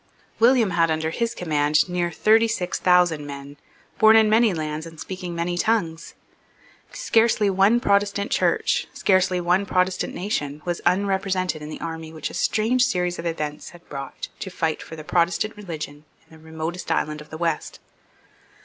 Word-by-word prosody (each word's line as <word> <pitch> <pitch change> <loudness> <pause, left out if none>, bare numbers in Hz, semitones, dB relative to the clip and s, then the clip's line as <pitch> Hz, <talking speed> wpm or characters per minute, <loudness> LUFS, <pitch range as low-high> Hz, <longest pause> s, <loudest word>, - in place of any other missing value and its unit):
William 235 -3 +4
had 165 -1 +2
under 160 0 -1
his 230 +5 -2
command 150 -2 +1
near 175 -1 -1
thirty 220 +6 +3
six 185 -6 -2
thousand 180 -4 +3
men, 140 0 -8 0.4
born 220 0 +7
in 220 -1 +5
many 225 0 +4
lands, 155 -1 -4
and 160 -1 -13
speaking 180 -2 -6
many 175 +1 -2
tongues. 170 -8 -1 0.8
Scarcely 225 -3 +2
one 195 +5 +4
Protestant 200 +1 +1
Church, 270 - +1
scarcely 185 -2 +2
one 180 +3 +2
Protestant 185 0 0
nation, 150 -7 -3
was 175 -1 -2
unrepresented 185 -2 0
in 150 - -7
the - - -7
army 160 -1 -6
which 160 -2 -5
a - - -12
strange 235 +4 +1
series 180 -5 0
of 170 - -3
events 150 -2 -4
had 175 -1 -17
brought 135 -1 -7
to 190 - -5
fight 160 -3 -2
for 160 - -9
the 155 - -9
Protestant 175 +6 0
religion 155 -7 -7 0.2
in 160 - -17
the 160 - -18
remotest 160 +2 -5
island 150 0 -1
of 150 - -14
the 155 - -7
west. 165 -2 -2
175 Hz, 165 wpm, -23 LUFS, 160-200 Hz, 0.8 s, born